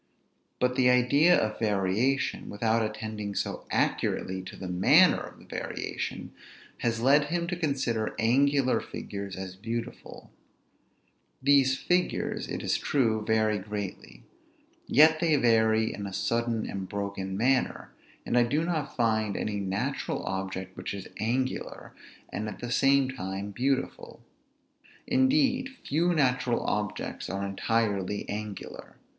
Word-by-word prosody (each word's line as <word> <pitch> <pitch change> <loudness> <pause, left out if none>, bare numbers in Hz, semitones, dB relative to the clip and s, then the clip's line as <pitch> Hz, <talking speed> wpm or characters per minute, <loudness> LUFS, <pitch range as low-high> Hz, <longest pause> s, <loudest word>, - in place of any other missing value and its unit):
But 125 0 +1
the 125 -1 +5
idea 140 +8 +5
of 110 0 -1
variation, 105 +5 0
without 110 +2 +1
attending 110 -1 -4
so - - -3
accurately 95 0 0
to - - -9
the 95 - -7
manner 90 +1 +5
of - - -9
the - - -17
variation, - - -5 0.5
has 115 -1 -1
led 140 +4 +5
him 170 +3 -1
to 180 - -1
consider 135 -9 -1
angular 135 +3 +3
figures 100 -1 -6
as 95 0 -6
beautiful; 115 +4 -6 1.1
these 135 -1 +4
figures, 180 0 0
it - - -4
is - - +1
true, 110 -6 +1
vary 110 -1 +2
greatly, 100 - -6 0.6
yet 155 +3 +6
they 165 -2 +3
vary 110 -3 +3
in 100 -1 -5
a 95 - -8
sudden 115 +1 -1
and 95 -1 -5
broken 100 -1 -4
manner, 130 +4 +1 0.3
and - - -1
I - - +6
do 145 +7 +1
not 155 -5 -2
find 110 -4 +1
any 105 -1 -2
natural 95 0 -2
object 95 -1 -4
which 90 +2 -5
is 95 - -8
angular, 130 +4 -2 0.4
and 105 +1 -3
at - - -8
the 120 0 -6
same 135 +1 +3
time 100 -4 -5
beautiful. 135 - -2 0.8
Indeed, 260 +1 +2 0.2
few 165 +5 +2
natural 125 -6 +1
objects 105 -1 -3
are 100 +1 -2
entirely 100 -1 -1
angular. 105 -1 -7
115 Hz, 130 wpm, -28 LUFS, 100-135 Hz, 1.1 s, yet